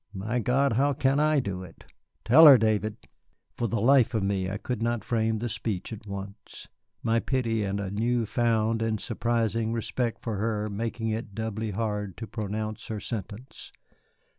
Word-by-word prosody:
My 110 +6 -2
God, 130 +3 +2
how 140 +5 +2
can 135 +2 +1
I 155 -1 +3
do 100 -7 -3
it? 90 -3 -13 0.4
Tell 155 +7 +9
her, 140 -3 +10
David." 110 -1 -1 0.5
For 120 - -1
the 115 - -1
life 125 +1 +4
of 110 - +1
me 95 -1 0
I 100 - -3
could 120 +1 -4
not 115 -2 0
frame 110 -1 0
the 120 +3 -3
speech 110 -2 -4
at 105 -1 -10
once, 100 +1 -8 0.4
my 115 0 +2
pity 115 -4 0
and 100 0 -2
a 100 -2 -4
new 115 +3 0
found 115 0 +1
and 110 -1 0
surprising 115 0 -1
respect 115 +1 -2
for 110 -4 -2
her 105 0 -1
making 115 +2 -3
it 110 -2 -4
doubly 110 0 -3
hard 105 -2 -3
to 115 - -5
pronounce 110 0 -4
her 110 -1 -4
sentence. 110 +4 -7
110 Hz, 175 wpm, -27 LUFS, 105-120 Hz, 0.5 s, her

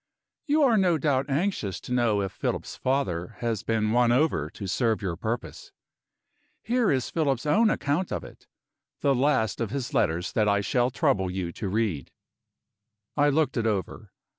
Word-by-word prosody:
"You 300 +1 +3
are 240 -5 +4
no 180 -4 +3
doubt 140 -2 0
anxious 140 - -1
to 125 - -5
know 115 -5 +2
if 95 - -3
Philip's - - -3
father 95 -11 -1
has 115 -4 -2
been 110 -1 0
won 120 0 +3
over 125 - +1
to 100 - -8
serve 110 +3 +1
your 95 -5 -3
purpose. 110 +6 -5 0.9
Here 240 -2 +1
is 130 -3 0
Philip's 140 -6 0
own 215 +9 +4
account 160 0 -1
of - - -3
it: - - -14 0.5
the 140 - +3
last 130 -4 +1
of 115 - -1
his 130 -1 -4
letters 90 -3 0
that 105 -1 +2
I 100 0 +2
shall 120 +4 +1
trouble 95 -6 +1
you 90 -2 -3
to 100 +2 -5
read." 100 - -1 1.1
I 145 0 +4
looked 150 -1 +1
it 115 -1 +1
over. 100 -6 -3
120 Hz, 170 wpm, -26 LUFS, 100-145 Hz, 1.1 s, are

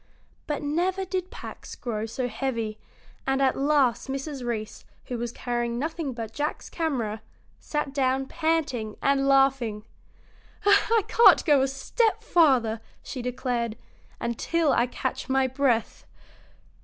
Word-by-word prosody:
But 295 0 -2
never 360 +6 0
did 370 0 -3
packs - - -9
grow 225 -3 -3
so 245 +3 -2
heavy, 225 -2 -3 0.5
and 270 0 +2
at 270 -1 +3
last 275 -4 +2
Mrs. 275 0 -4
Reece, 220 -3 -4 0.2
who 245 -2 -4
was 235 0 -3
carrying 240 -1 -2
nothing 310 +1 -2
but 225 -2 -6
Jack's 295 +1 -3
camera, 240 -10 -2 0.4
sat 295 -2 -3
down 265 -1 +1
panting 295 -9 -1
and 275 0 +3
laughing. 270 -6 +3 0.8
"I 410 +2 +4
can't 470 - +6
go 290 -5 +5
a 265 - +2
step 430 - 0
farther," 250 -10 +3 0.2
she 255 - -5
declared, 240 -2 -2 0.4
"until 295 +7 0
I 240 - +3
catch 250 - -4
my 265 0 +3
breath." 260 -3 0
265 Hz, 130 wpm, -26 LUFS, 235-295 Hz, 0.8 s, can't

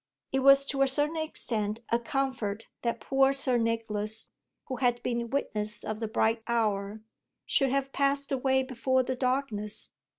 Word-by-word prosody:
It 270 - +1
was 275 +1 +6
to 275 -1 -1
a 275 - +5
certain 290 +4 +1
extent 225 -8 -2
a 235 - +2
comfort 235 -4 -2
that 235 -1 -2
poor 270 0 +3
Sir 260 -3 +2
Nicholas, 225 -1 0 0.4
who 260 - -5
had 245 -1 +1
been 235 -1 -2
witness 210 -6 -2
of 215 0 -4
the 225 - -2
bright 225 +1 +1
hour, 215 -2 0 0.4
should 270 - +2
have 275 +1 -1
passed 280 0 +1
away 265 0 +2
before 260 0 0
the 260 +1 -2
darkness. 250 -5 -2
250 Hz, 160 wpm, -29 LUFS, 220-270 Hz, 0.4 s, was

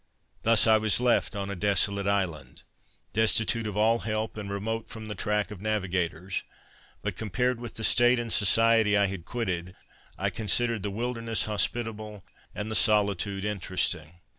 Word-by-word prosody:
Thus 115 -1 +4
I 110 -1 +6
was 110 0 +2
left 120 -3 +2
on 100 0 -3
a - - -4
desolate 100 +1 +1
island, 85 -10 -2 0.5
destitute 110 +1 +2
of 105 -1 -4
all 115 +2 +3
help, 110 0 -3
and 105 -2 -6
remote 110 +3 -3
from 110 -1 -8
the 105 - -4
track 105 -1 -1
of 100 -3 -9
navigators; 95 -4 -1 0.6
but - - -2
compared 125 +3 -1
with 120 -2 -8
the 110 - -3
state 120 +2 +4
and 120 -1 -2
society 110 +1 +4
I 100 - +4
had 95 -3 -5
quitted, 90 -7 -3 0.4
I - - -1
considered 115 +1 0
the 100 - -2
wilderness 115 +1 -1
hospitable, 105 -1 -2 0.3
and 105 +1 -4
the - - -2
solitude 100 -2 +2
interesting. 90 -4 -2
105 Hz, 160 wpm, -27 LUFS, 100-115 Hz, 0.6 s, I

